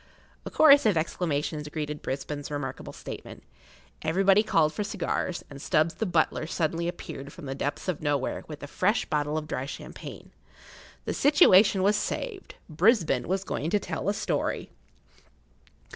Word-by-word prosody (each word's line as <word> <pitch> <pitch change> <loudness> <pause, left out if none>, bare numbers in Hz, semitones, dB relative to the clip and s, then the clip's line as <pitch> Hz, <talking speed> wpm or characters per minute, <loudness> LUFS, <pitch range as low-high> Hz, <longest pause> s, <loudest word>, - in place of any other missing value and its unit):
A - - -3
chorus 285 -4 +6
of 200 -6 +3
exclamations 155 -2 -2
greeted 150 -1 -4
Brisbane's 145 +2 -4
remarkable 145 -3 -5
statement. - - -9 0.6
Everybody 190 +5 +4
called 160 -8 +2
for 210 - -2
cigars, 185 -3 -2
and 140 -1 -10
Stubbs 155 +3 +2
the 220 - -2
butler 160 -2 +1
suddenly 165 +1 -1
appeared 140 -5 -6
from 175 - -11
the 135 - -3
depths 140 +5 -3
of 180 -4 -2
nowhere 145 -3 -1
with 150 -2 -9
a - - -5
fresh 200 +9 +1
bottle 150 0 -1
of 155 -1 -4
dry 130 -2 -3
champagne. - - -9 0.7
The - - -2
situation[Pg 215 -9 +6
9] 190 - 0
was 205 +2 +4
saved; 415 -6 -4
Brisbane 165 - +2
was 190 +2 0
going 160 -4 -3
to 210 - +2
tell 200 - -3
a 205 - 0
story. - - -2
160 Hz, 160 wpm, -27 LUFS, 150-195 Hz, 0.7 s, chorus